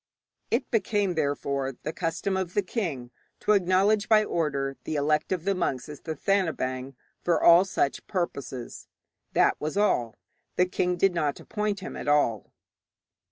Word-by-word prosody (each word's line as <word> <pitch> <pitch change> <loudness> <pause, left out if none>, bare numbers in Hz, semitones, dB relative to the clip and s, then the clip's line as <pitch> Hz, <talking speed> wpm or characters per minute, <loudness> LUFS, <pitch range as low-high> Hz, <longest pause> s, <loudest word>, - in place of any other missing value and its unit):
It 235 - -1
became, 205 -4 +1
therefore, 140 -4 -1
the 155 - -3
custom 170 +4 -2
for 190 0 0
the 185 +4 -1
king 160 - -3 0.3
to - - +1
acknowledge 200 +2 +3
by 215 -1 +6
order 140 -7 -1
the 155 - -3
elect 150 +3 +1
of 180 -2 -1
the 200 - +2
monks 135 -9 -2
as 150 -1 -9
Thathanabaing 150 -6 -1 0.3
for 170 -2 +2
all 170 +2 +7
such 145 -7 -1
purposes. 140 - -4 0.5
That - - +3
was 155 +5 -3
all. 120 - +1 0.4
The 180 - +4
king 180 0 -1
did 195 +1 +3
not 150 -4 -1
appoint 210 -2 -3
him - - -7
at - - -6
all. 145 -8 +2
170 Hz, 155 wpm, -27 LUFS, 140-195 Hz, 0.5 s, all